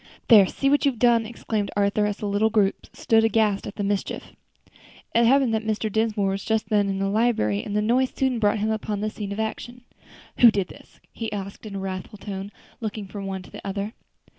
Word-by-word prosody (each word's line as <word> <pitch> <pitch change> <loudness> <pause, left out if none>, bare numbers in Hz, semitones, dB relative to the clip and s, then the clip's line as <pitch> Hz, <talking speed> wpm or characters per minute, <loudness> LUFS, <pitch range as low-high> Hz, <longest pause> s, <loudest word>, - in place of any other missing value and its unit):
"There, 210 -5 +8
see 275 - -2
what 285 +1 +3
you've 275 -4 +1
done!" 230 -1 +3
exclaimed 215 -3 -3
Arthur, 205 +1 +2
as 205 0 -3
the - - -5
little 205 +2 +2
group 205 -3 +1
stood 225 -1 +2
aghast 220 -2 +2
at 200 - -7
the 205 - -3
mischief. 200 0 -2 0.8
It 235 0 +4
happened 265 -2 +4
that 220 - +1
Mr. 220 0 -1
Dinsmore 215 -2 +1
was 195 +1 -3
just 220 -1 -1
then 205 -2 +2
in 195 - -1
the 195 0 0
library, 200 - +1
and 205 - -5
the 210 - +2
noise 250 +4 +2
soon 260 -3 -1
brought 210 0 +2
him 215 +1 0
upon 210 -1 -3
the 215 0 -1
scene 205 -2 -6
of 200 - -4
action. 240 +3 -4 0.6
"Who 240 - +9
did 200 -5 -1
this?" - - -16
he 225 -2 -4
asked, 200 +1 -6
in 200 - -7
a - - -3
wrathful 190 +2 -5
tone, 200 0 -6 0.3
looking 215 -2 -4
from 195 0 -7
one 190 -1 -4
to - - -15
the - - -9
other. 200 +2 -4
210 Hz, 220 wpm, -24 LUFS, 200-225 Hz, 0.8 s, Who